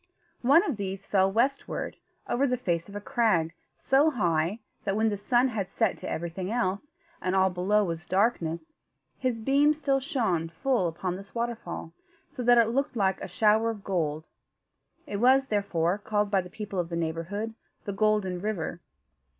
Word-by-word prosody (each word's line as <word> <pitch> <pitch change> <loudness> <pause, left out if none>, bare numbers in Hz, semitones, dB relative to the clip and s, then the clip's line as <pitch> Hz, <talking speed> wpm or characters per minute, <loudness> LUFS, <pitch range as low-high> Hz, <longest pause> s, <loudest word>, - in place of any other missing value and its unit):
One 280 +7 +5
of 275 - -2
these 195 -1 -4
fell 190 -1 +3
westward, 255 +7 -1 0.3
over 275 +3 +2
the 250 -1 0
face 170 -7 -2
of 200 - -10
a - - -2
crag 200 -7 +1 0.2
so 280 +4 +3
high, 175 - 0 0.3
that, 195 -1 -1
when 220 +1 +2
the 205 - -1
sun 240 +6 +2
had 205 -6 -3
set - - +1
to 185 - -5
everything 170 +3 -4
else, 225 +2 -1 0.3
and 185 +1 0
all 190 0 +4
below 195 +4 +2
was 170 -2 -4
darkness, 195 - 0 0.5
his 250 -3 -1
beams 285 +5 +3
still 275 -3 +1
shone 225 - -1
full 235 - 0
upon 175 +2 -3
this 195 +3 -11
waterfall, 230 -8 -4 0.3
so - - -7
that 245 0 +5
it 230 -1 +5
looked 270 +2 -1
like 190 -3 +1
a - - -4
shower 215 +4 +3
of 215 -3 -5
gold. 160 -5 -2 0.8
It 205 - -4
was, 260 +4 +5
therefore, 200 -5 0
called 210 -1 0
by 195 -2 +3
the 180 - -11
people 205 -1 -5
of 170 -1 -2
the 170 - -3
neighbourhood, 170 +7 -3 0.3
the 200 - -3
Golden 200 -3 +1
River. 185 -5 -3
205 Hz, 175 wpm, -28 LUFS, 180-240 Hz, 0.8 s, One